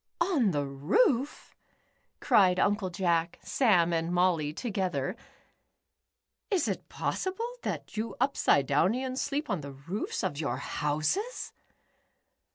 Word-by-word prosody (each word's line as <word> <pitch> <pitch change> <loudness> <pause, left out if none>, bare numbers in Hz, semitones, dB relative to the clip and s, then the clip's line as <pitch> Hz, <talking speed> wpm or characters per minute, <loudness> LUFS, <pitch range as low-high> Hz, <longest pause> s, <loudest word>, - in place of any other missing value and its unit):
"On 335 - +2
the 145 -5 0
roof?" 230 - +1 0.6
cried 190 -8 +4
Uncle 205 -1 +1
Jack, 170 -2 0
Sam, 180 -10 +3
and 165 +1 0
Molly 175 -4 +2
together. 190 0 -2 1.3
"Is 390 -6 +1
it - - -4
possible 455 +6 -3
that - - -5
you 220 -1 -3
Upside 140 -2 +3
downlans 250 - +1
sleep 285 +1 -2
on 195 -7 -1
the 140 -1 -8
roofs 165 +10 -4
of 145 - -2
your 150 - -1
houses 155 - -2
185 Hz, 115 wpm, -29 LUFS, 165-260 Hz, 1.3 s, cried